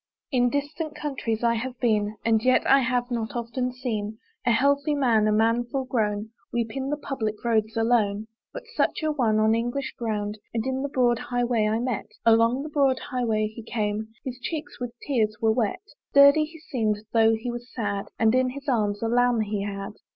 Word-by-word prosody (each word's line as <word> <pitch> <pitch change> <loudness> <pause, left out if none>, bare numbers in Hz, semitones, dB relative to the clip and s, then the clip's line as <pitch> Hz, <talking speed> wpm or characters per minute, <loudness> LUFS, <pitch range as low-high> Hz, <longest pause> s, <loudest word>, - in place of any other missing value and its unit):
In 245 -2 +3
distant 290 +3 -3
countries 250 -6 -3
I 235 0 +4
have 250 +2 -4
been, 215 -3 +1
And 225 -1 +3
yet 255 0 +3
I 275 - +6
have 250 -1 0
not 230 -1 -3
often 240 +2 -2
seen 220 -4 -4 0.3
A - - +5
healthy 280 +5 +2
man, 235 -6 +3
a - - +3
man 225 +3 +3
full 265 +1 -3
grown 215 -4 -1 0.2
Weep 230 -2 -2
in 270 0 -2
the 295 - -1
public 225 -7 -3
roads 220 -1 +1
alone. 220 -3 +2 0.3
But - - -7
such - - 0
a 310 - +2
one, 235 -7 +1
on 215 0 +4
English 240 +4 -2
ground, 210 -2 -2 0.2
And 225 - -1
in 265 0 -1
the 280 - -2
broad 245 -3 +2
high 245 -1 -1
way, 235 -3 +1
I 215 +1 +1
met; 240 -2 -2 0.2
Along 230 +3 +4
the 310 - -6
broad 275 -3 +2
high 250 -2 0
way 215 -1 +1
he 220 +2 -7
came, 215 -1 -2 0.2
His 255 -1 -5
cheeks 310 +2 -5
with 245 -1 -4
tears 220 -6 +1
were 220 -1 +3
wet. 245 - -1 0.3
Sturdy 280 +2 +7
he 325 +2 -13
seemed, 220 -9 -1
though 225 -1 +5
he 240 +2 -4
was 240 +1 -8
sad; 205 -4 -3
And 225 0 +3
in 255 0 +3
his 275 +2 -9
arms 210 -5 0
a - - +1
lamb 245 0 +3
he 210 -1 -2
had. 200 0 -4
235 Hz, 205 wpm, -25 LUFS, 220-260 Hz, 0.3 s, Sturdy